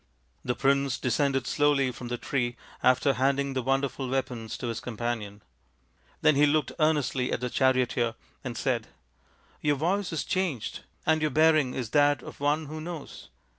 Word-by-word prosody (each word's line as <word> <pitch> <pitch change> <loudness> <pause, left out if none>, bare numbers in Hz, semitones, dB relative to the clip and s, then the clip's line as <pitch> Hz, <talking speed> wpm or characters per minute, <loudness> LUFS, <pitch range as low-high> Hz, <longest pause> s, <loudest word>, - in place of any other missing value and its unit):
The 125 - -1
prince 140 -1 +2
descended 135 +1 +1
slowly 140 -2 +2
from 125 0 -8
the 120 0 -3
tree 120 -2 -1 0.3
after 130 +2 +4
handing 140 +2 +1
the 130 - -1
wonderful 135 0 -1
weapons 125 -4 -3
to - - -6
his 115 - -3
companion. 110 -3 -4 0.8
Then 155 -1 +5
he 145 +1 +5
looked 155 +1 +1
earnestly 145 -5 +1
at - - 0
the 125 0 -3
charioteer 125 -3 +2 0.3
and 120 -3 -5
said, 120 -4 -1 0.4
" - - -34
Your 145 -1 +2
voice 180 +7 0
is 165 - -1
changed, 180 - -2 0.3
and 160 0 +3
your 155 - +2
bearing 155 -2 +3
is 120 -4 -4
that 145 0 +3
of - - -10
one 145 +2 +1
who 155 +2 -7
knows. 165 -2 -8
135 Hz, 170 wpm, -28 LUFS, 125-150 Hz, 0.8 s, Then